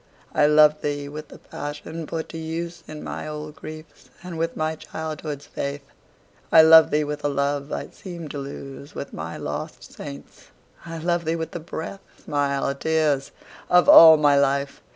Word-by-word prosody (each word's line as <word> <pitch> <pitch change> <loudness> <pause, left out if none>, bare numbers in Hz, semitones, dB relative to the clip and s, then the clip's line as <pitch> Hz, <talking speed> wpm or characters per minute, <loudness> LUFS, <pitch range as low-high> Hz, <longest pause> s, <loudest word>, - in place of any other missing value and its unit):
I 150 - +4
love 150 0 +5
thee 145 -1 -3
with 150 +1 -8
the - - -13
passion 150 +2 -7
put 160 +1 -4
to 165 - -7
use 165 +1 -5
In 155 -1 -8
my - - -6
old 150 0 -7
griefs, 155 0 -11
and 180 -2 -7
with 165 +1 -2
my 155 0 -1
childhood's 155 -2 -6
faith. 140 0 -5 0.7
I 160 - +9
love 160 0 +8
thee 150 +1 +1
with 150 0 -5
a - - +2
love 140 0 -1
I - - -4
seemed 170 -5 -8
to 145 - -5
lose 140 +1 -9
With - - -7
my 80 +1 -6
lost - - -6
saints,—I 75 - -11
love 170 +1 0
thee 160 +1 0
with 165 -1 -4
the 175 - -5
breath, 165 +4 -7 0.2
Smiles, 140 -1 -1
tears, 155 -4 +1 0.4
of 180 0 +5
all 160 -1 +10
my 145 -1 +4
life! 140 0 0
150 Hz, 175 wpm, -23 LUFS, 145-160 Hz, 0.7 s, all